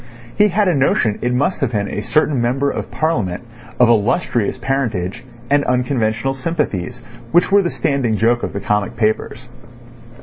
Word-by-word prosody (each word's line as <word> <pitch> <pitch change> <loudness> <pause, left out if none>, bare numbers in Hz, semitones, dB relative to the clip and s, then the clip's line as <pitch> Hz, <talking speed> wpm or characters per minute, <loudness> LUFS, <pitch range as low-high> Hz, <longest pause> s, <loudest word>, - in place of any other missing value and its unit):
He 210 - +5
had 205 +1 +1
a 180 - +3
notion 135 -6 +1
it 120 - 0
must 145 +7 0
have 130 -3 0
been 100 -1 0
a 105 - -4
certain 150 0 +1
Member 135 +4 0
of - - -5
Parliament 120 - -1 0.4
of 125 - +6
illustrious 120 - +1
parentage 115 -10 -2 0.2
and 145 +2 +2
unconventional 125 0 0
sympathies, 130 - -3 0.3
which 175 +3 +3
were 200 0 +6
the 175 - -1
standing 130 -10 0
joke 120 +2 +2
of - - -4
the 100 - -4
comic 105 -1 -1
papers. 110 -1 -1
125 Hz, 165 wpm, -18 LUFS, 110-145 Hz, 0.4 s, of